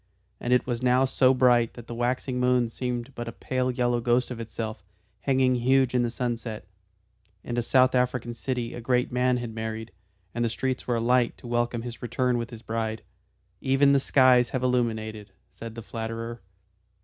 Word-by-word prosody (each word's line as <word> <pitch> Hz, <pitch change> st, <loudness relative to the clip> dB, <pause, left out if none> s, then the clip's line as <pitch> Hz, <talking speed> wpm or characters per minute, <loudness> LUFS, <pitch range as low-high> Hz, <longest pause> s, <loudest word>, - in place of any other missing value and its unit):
And 120 Hz, -, -3 dB
it 125 Hz, -, +4 dB
was 120 Hz, -1 st, -2 dB
now 125 Hz, +1 st, +4 dB
so 130 Hz, 0 st, +4 dB
bright 125 Hz, -3 st, +3 dB
that 120 Hz, -, -10 dB
the 120 Hz, -, -7 dB
waxing 125 Hz, +2 st, -1 dB
moon 125 Hz, -2 st, +2 dB
seemed 125 Hz, +1 st, -4 dB
but 120 Hz, -1 st, -6 dB
a -, -, -4 dB
pale 130 Hz, +2 st, -2 dB
yellow 120 Hz, -1 st, 0 dB
ghost 120 Hz, +2 st, +1 dB
of 120 Hz, -, -5 dB
itself, 110 Hz, -1 st, -5 dB, 0.4 s
hanging 130 Hz, -2 st, +2 dB
huge 130 Hz, +1 st, +3 dB
in 125 Hz, -, +3 dB
the 120 Hz, -, 0 dB
sunset. 120 Hz, -2 st, -4 dB, 0.8 s
In 120 Hz, -, -4 dB
a 120 Hz, -, +1 dB
South 130 Hz, +2 st, +4 dB
African 125 Hz, -1 st, 0 dB
city 120 Hz, 0 st, -3 dB
a 120 Hz, -, -6 dB
great 125 Hz, +1 st, +1 dB
man 125 Hz, 0 st, +2 dB
had 120 Hz, -2 st, -5 dB
married, 110 Hz, 0 st, -5 dB, 0.4 s
and 120 Hz, -, -1 dB
the 115 Hz, -, +1 dB
streets 130 Hz, +3 st, -3 dB
were 120 Hz, -, +1 dB
alight 120 Hz, +1 st, +2 dB
to -, -, -16 dB
welcome 120 Hz, -1 st, -1 dB
his 120 Hz, -1 st, -7 dB
return 125 Hz, +1 st, 0 dB
with 115 Hz, -, -4 dB
his 115 Hz, -1 st, -10 dB
bride. 110 Hz, -1 st, -3 dB, 0.6 s
"Even 135 Hz, +1 st, +4 dB
the 140 Hz, -, +5 dB
skies 130 Hz, -3 st, +4 dB
have 130 Hz, -1 st, -2 dB
illuminated," 110 Hz, -5 st, -1 dB, 0.2 s
said 115 Hz, +4 st, -9 dB
the 115 Hz, -, -7 dB
flatterer. 115 Hz, +1 st, -5 dB
120 Hz, 185 wpm, -26 LUFS, 115-125 Hz, 0.8 s, the